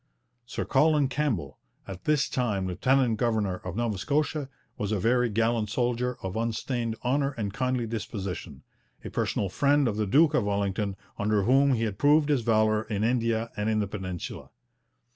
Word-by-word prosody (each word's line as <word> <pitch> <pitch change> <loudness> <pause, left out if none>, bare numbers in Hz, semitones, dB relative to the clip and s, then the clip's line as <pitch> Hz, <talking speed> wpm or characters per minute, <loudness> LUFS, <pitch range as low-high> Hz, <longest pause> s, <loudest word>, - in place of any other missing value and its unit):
Sir - - -3
Colin 150 0 +3
Campbell, 135 - -2 0.3
at 95 -2 -8
this 150 -1 +2
time 105 -7 -1
lieutenant 120 +5 +2
governor 110 -5 0
of 90 -1 -7
Nova 115 -4 -1
Scotia, 145 +1 -1 0.3
was 105 0 -3
a 105 - +1
very 120 +4 +2
gallant 115 0 +1
soldier 125 +1 -1
of 95 +1 -4
unstained 115 +1 -2
honour 140 +2 +1
and 105 -6 -4
kindly 125 0 -1
disposition, 110 -5 -5 0.4
a - - -6
personal 100 - -1
friend 140 +7 +2
of 105 -2 -1
the 105 -1 0
Duke 155 +8 +4
of 125 - +2
Wellington, 100 0 -1 0.2
under 105 -1 +1
whom 135 +4 +4
he 115 - -1
had 105 -3 -3
proved 150 +1 +4
his 140 -4 +2
valour 110 -1 +2
in 105 -2 -2
India 115 -1 0
and 105 +1 -1
in 110 - +1
the 105 - +1
Peninsula. 95 -3 -6
115 Hz, 170 wpm, -27 LUFS, 105-130 Hz, 0.4 s, Duke